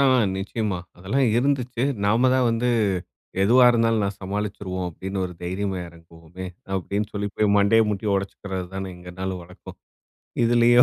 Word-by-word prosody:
ஆ - - +5 0.3
நிச்சயமா, 100 +1 -2 0.2
அதெல்லாம் 105 +10 +1
இருந்துச்சு. 125 -2 0 0.2
நாம 115 +5 +4
தான் 130 -1 +3
வந்து, 115 +2 0 0.7
எதுவா 125 +6 +6
இருந்தாலும் 115 -2 +2
நான் 100 0 -3
சமாளிச்சுருவோம் 95 -2 -3
அப்டீன்னு 95 +3 -5
ஒரு 90 - -5
தைரியமா 95 +2 -2
இறங்குவோமே. 85 +2 -11 0.3
அப்பிடின்னு 100 +3 -2
சொல்லி 105 0 -1
போய் 110 - +3
மண்டைய 100 +3 +5
முட்டி 105 +1 -3
உடைச்சுக்கிறது 95 -1 -3
தானே, 95 0 -3
எங்க 90 0 -10
நாலும் 95 -1 -3
வழக்கம். 90 +1 -12 0.7
இதுலேயும் 120 +1 +6
100 Hz, 145 wpm, -24 LUFS, 95-115 Hz, 0.7 s, எதுவா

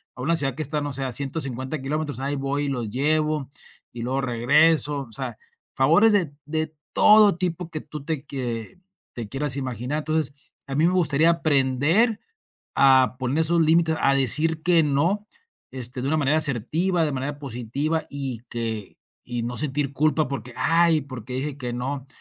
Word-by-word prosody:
a 125 - -9
una 165 +6 +1
ciudad 135 -5 +1
que 155 - -4
está, 150 +1 -2
no 145 - -3
sé, 135 0 -1
a 130 - -3
150 135 0 -1
km". 150 0 -3
Ahí 140 +2 -2
voy 140 +1 -2
y - - -2
los 120 -5 -3
llevo 150 +2 0 0.4
y 120 - -7
luego 130 +2 -1
regreso, 145 +4 +3
o - - -18
sea, - - -4 0.4
favores 165 +12 +4
de 175 -8 +1
de 155 +1 -3 0.2
todo 210 -4 +6
tipo 175 -1 -3
que 155 - -4
tú 150 -2 -9
te 155 -3 -3
quie 125 - -5 0.3
te 115 -4 -7
quieras 135 +1 +1
imaginar. 130 +2 -3
Entonces 155 -2 -2 0.3
a 135 - -4
mí 155 +3 +3
me 180 - +1
gustaría 165 -3 +3
aprender 160 - +2 0.6
a 130 -3 +5
poner 130 +4 -1
esos 165 +1 +3
límites, 160 0 +3
a 135 - +4
decir 155 +5 +3
que 175 -2 +4
no, 165 +9 0 0.5
este, 125 -1 -5
de 135 - -2
una 155 - +1
manera 150 +1 +2
asertiva, 160 - +1
de 150 - -1
manera 140 +2 -4
positiva 140 +5 -3
y 135 -5 -5
que 110 -4 -4 0.3
y 120 -1 -4
no 120 +1 -4
sentir 145 -1 -1
culpa 155 +1 +1
porque: 125 -3 -6
"Ay, 165 0 +4
¿porqué 130 -3 -9
dije 140 +2 -4
que 125 -3 -5
no?". 135 +2 -4
145 Hz, 180 wpm, -23 LUFS, 130-160 Hz, 0.6 s, todo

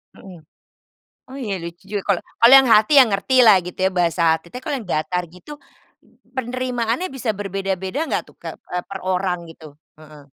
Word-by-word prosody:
Mhm. 185 -4 -13 0.9
Oh 265 - -10
iya, 230 -8 -4
lucu 170 +2 -9
juga, 205 -2 -3
kalau 195 -4 +1 0.2
kalau 235 +3 +7
yang 265 -1 +3
hati 215 +7 +3
ya 265 - +9
ngertilah, 220 +1 +4
gitu 180 - -9
ya, 190 - +2
bahasa 170 0 +1
hati. 160 +1 -4
Tapi 250 +7 -9
kalau 290 - -2
yang 205 - -12
datar 180 +4 -1
gitu, 235 - -13 0.8
penerimaannya 250 +4 -2
bisa 260 -4 -3
berbeda-beda 195 +1 -4
nggak - - -1
tuh - - -35
kek - - -8 0.2
eee, 180 0 -2
per 195 - -6
orang, 185 -1 -1
gitu? 160 -1 -14 0.3
Heeh. 150 -2 -15
195 Hz, 180 wpm, -20 LUFS, 180-245 Hz, 0.9 s, ya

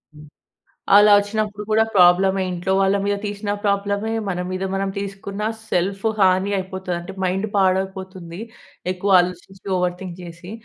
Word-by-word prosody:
హ్మ్. 150 0 -13 0.7
అలా 210 +1 +7
వచ్చినప్పుడు 210 0 -3
కూడా 220 +1 +5
ప్రాబ్లమే. 190 +1 +5
ఇంట్లో 180 +2 -3
వాళ్ళ 195 +1 +3
మీద 205 0 +1
తీసిన 205 0 -4
ప్రాబ్లమే, 200 +1 0 0.2
మన 180 -2 -2
మీద 185 +1 -3
మనం 195 0 -1
తీసుకున్న 200 +1 -5 0.3
సెల్ఫు 195 +4 0
హాని 190 +1 +3
అయిపోతది. 190 -1 -4
అంటే 175 +3 -9
మైండ్ 190 +3 0
పాడైపోతుంది 190 -2 -1 0.5
ఎక్కువ 185 +2 -2
ఆలోచించి 180 +2 -4
ఓవర్ 180 -1 0
థింక్ 185 -3 -7
చేసి. 175 +2 -10
190 Hz, 140 wpm, -21 LUFS, 180-200 Hz, 0.7 s, అలా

